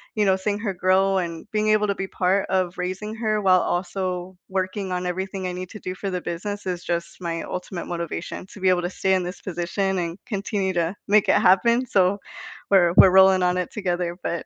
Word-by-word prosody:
you 210 -1 +2
know, 190 -1 +4
seeing 205 +2 -2
her 205 -3 -2
grow 190 +1 +2
and 170 +2 -4
being 215 0 +1
able 215 0 +3
to 200 - 0
be 195 0 -4
part 190 +2 +1
of 185 -2 0
raising 185 +4 -4
her, 215 -2 0
while 185 -2 +5
also 180 0 -3
working 190 +1 -2
on 180 0 -2
everything 190 +1 -3
I 180 - -3
need 185 0 -6
to 215 - -9
do 185 -1 -5
for 195 +1 -4
the 180 - -2
business, 205 +4 -5
is 180 -1 -3
just 170 0 -4
my 165 -1 -3
ultimate 180 0 -5
motivation; 170 +1 -5
to 200 - -13
be 190 - 0
able 180 -1 +3
to 175 - -2
stay 190 +1 0
in 185 -1 +2
this 180 +2 -6
position 190 +2 -2
and 170 +1 -3
continue 200 -3 -2
to 170 +2 -1
make 210 0 +4
it - - +6
happen, 235 +7 +4
so 195 -3 +2 0.5
we're 175 -4 +5
we're 185 - +9
rolling 190 0 +6
on 180 0 +2
it 180 - -2
together, 175 -4 -2
but 170 - -2
185 Hz, 220 wpm, -23 LUFS, 180-200 Hz, 0.5 s, we're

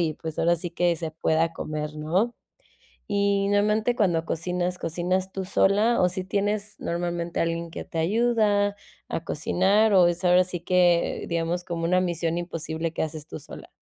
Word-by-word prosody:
y, 160 -2 0
pues, 160 0 -7
ahora 170 +1 +3
sí 175 +1 -5
que 175 0 +1
se 160 -1 -4
pueda 160 +1 +1
comer, 150 -1 -4
¿no? 180 +10 0 0.7
Y 200 -1 +1
normalmente 210 +4 +2
cuando 175 -6 +2
cocinas, 180 +2 -2
¿cocinas 180 +3 -1
tú 190 - -3
sola 205 +5 +3
o 180 - +5
si 185 +1 -3
tienes 205 +2 -1
normalmente 170 0 -2
alguien 165 0 -2
que - - -6
te - - -8
ayuda 205 +1 +2 0.3
a 165 - -3
cocinar, 195 +8 +2
o 180 -2 +6
es 175 +1 -2
ahora 180 0 +5
sí 175 -2 -5
que 175 -1 +2
digamos, 170 +1 -1
como 170 -2 -4
una 180 +2 +3
misión 170 -2 -1
imposible 165 -1 -3
que - - -1
haces 155 -1 -6
tú - - -7
sola? - - -11
175 Hz, 175 wpm, -25 LUFS, 165-200 Hz, 0.7 s, o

